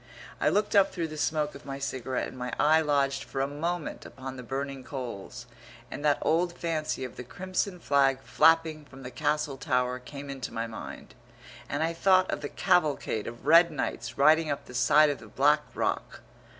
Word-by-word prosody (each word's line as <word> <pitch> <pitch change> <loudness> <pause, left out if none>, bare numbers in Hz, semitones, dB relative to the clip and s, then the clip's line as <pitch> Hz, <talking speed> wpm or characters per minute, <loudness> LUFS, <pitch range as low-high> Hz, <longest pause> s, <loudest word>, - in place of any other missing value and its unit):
I - - +3
looked 210 +1 +1
up 195 -1 +5
through 165 -3 -3
the 155 - -7
smoke 150 0 0
of 140 - -12
my 135 0 -6
cigarette 130 -2 -3
and - - -10
my 125 -1 -4
eye 155 +2 +5
lodged 140 -3 +1
for 135 - -6
a 135 - +2
moment 160 +3 -3
upon 130 0 -8
the 125 - -7
burning 135 +1 -4
coals, 125 -8 -7 0.5
and 145 - -6
that 145 -1 +3
old 170 +2 +1
fancy 155 -5 -2
of 125 - -7
the - - -6
crimson 185 - -3
flag 135 -3 +2
flapping 160 -1 +3
from 135 -1 -13
the 125 - -7
castle 150 -2 -1
tower 125 -3 0
came 140 +2 -9
into 135 -3 -6
my 115 +1 -2
mind, 115 -1 -9 0.6
and 145 +2 -1
I 165 +1 0
thought 185 +2 +3
of - - -3
the - - -4
cavalcade 155 - +1
of 120 +2 -9
red 170 +3 +7
knights 155 - -4
riding 155 +3 +5
up 145 - -3
the - - -12
side 150 +4 +5
of 145 - -5
the 110 - -12
black 145 +7 +3
rock. - - -2
145 Hz, 195 wpm, -28 LUFS, 130-160 Hz, 0.6 s, red